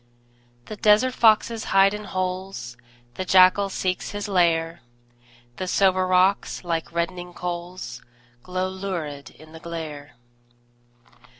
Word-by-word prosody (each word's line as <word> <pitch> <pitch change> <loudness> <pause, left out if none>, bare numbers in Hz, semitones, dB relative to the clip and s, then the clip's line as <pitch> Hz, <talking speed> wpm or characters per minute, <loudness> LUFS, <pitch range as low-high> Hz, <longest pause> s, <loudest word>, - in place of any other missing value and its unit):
The 215 - -8
desert 215 +5 +4
foxes 225 0 +3
hide 195 +1 +4
in 210 0 -6
holes, 185 -9 -4 0.4
The 185 - -4
jackal 185 +2 +5
seeks 185 -1 -2
his 205 0 -4
lair; 170 -3 +1 0.8
The 185 - -4
sombre 185 0 +2
rocks, 185 +2 +2
like 165 -2 -3
reddening 175 +1 -4
coals, 175 -8 -6 0.4
Glow 185 +3 -3
lurid 180 -7 -5
in 155 +1 -17
the 160 - -11
glare. 155 -4 -7
185 Hz, 115 wpm, -24 LUFS, 170-195 Hz, 0.8 s, jackal